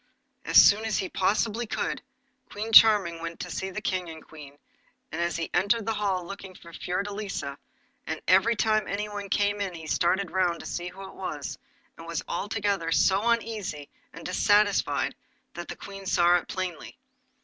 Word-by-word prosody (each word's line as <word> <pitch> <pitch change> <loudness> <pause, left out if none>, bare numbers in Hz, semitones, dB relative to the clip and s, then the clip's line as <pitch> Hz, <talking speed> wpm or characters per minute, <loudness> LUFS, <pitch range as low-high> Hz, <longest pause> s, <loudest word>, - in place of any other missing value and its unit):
As - - +7
soon 210 +2 +6
as 220 -2 0
he 190 - -2
possibly 220 +4 0
could, - - -2 0.5
King 215 +2 -5
Charming 205 -7 +7
went 165 0 -6
to 180 - -6
see 190 +4 -3
the 215 +3 -6
King 185 -4 -2
and 160 -1 -10
Queen, 145 -3 -12 0.5
and 165 +1 -3
as 170 0 -1
he 165 -1 -3
entered 210 +2 +2
the 225 - 0
hall 200 -4 -1
he - - -11
looked 195 -1 -9
for 170 0 -14
Fiordelisa, 195 -6 -4 0.5
and - - -3
every 195 +6 +5
time 215 +1 +1
anyone 205 0 -4
came 205 +1 +1
in 190 -3 -3
he 160 -1 -9
started 175 +3 +1
round 180 -2 +1
to - - -11
see 175 0 -4
who 190 +2 -9
it - - -12
was, 150 -7 -5 0.4
and 165 - -10
was 170 -2 -3
altogether 200 -2 -1
so 195 +6 +3
uneasy 215 -11 -2 0.2
and 165 - -11
dissatisfied 205 +2 +2 0.4
that - - -7
the - - -6
Queen 195 -1 -9
saw 175 -2 +4
it 175 - -6
plainly. 185 -4 -5
190 Hz, 180 wpm, -27 LUFS, 170-205 Hz, 0.5 s, As